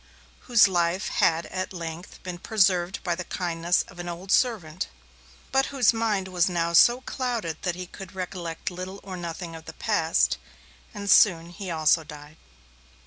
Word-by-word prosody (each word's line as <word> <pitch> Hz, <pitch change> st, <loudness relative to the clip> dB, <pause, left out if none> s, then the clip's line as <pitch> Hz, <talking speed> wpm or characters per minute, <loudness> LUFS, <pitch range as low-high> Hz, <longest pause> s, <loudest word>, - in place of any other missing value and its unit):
whose 235 Hz, -4 st, +7 dB
life 175 Hz, +1 st, 0 dB
had 170 Hz, -7 st, +2 dB
at 185 Hz, 0 st, -4 dB
length 170 Hz, -1 st, -7 dB
been 180 Hz, -1 st, -6 dB
preserved 185 Hz, -3 st, +1 dB
by 175 Hz, -, 0 dB
the 180 Hz, +2 st, -4 dB
kindness 175 Hz, -1 st, 0 dB
of 175 Hz, -, -15 dB
an 175 Hz, 0 st, -5 dB
old 180 Hz, +3 st, -6 dB
servant, 190 Hz, -9 st, +1 dB, 0.6 s
but 270 Hz, 0 st, +3 dB
whose 255 Hz, -5 st, +3 dB
mind 215 Hz, -4 st, 0 dB
was 180 Hz, -1 st, +1 dB
now 170 Hz, -1 st, -1 dB
so 240 Hz, +9 st, +6 dB
clouded 240 Hz, -, -3 dB
that 180 Hz, -2 st, -1 dB
he 180 Hz, 0 st, -6 dB
could 190 Hz, +2 st, -11 dB
recollect 180 Hz, -2 st, -4 dB
little 185 Hz, +2 st, -7 dB
or 190 Hz, -1 st, -7 dB
nothing 170 Hz, -1 st, -6 dB
of 160 Hz, 0 st, -11 dB
the -, -, -8 dB
past; 185 Hz, -8 st, +1 dB, 0.5 s
and 200 Hz, 0 st, -7 dB
soon 170 Hz, -5 st, +5 dB
he 185 Hz, +2 st, -7 dB
also 160 Hz, 0 st, +3 dB
died. 150 Hz, 0 st, -12 dB
180 Hz, 165 wpm, -26 LUFS, 170-200 Hz, 0.6 s, whose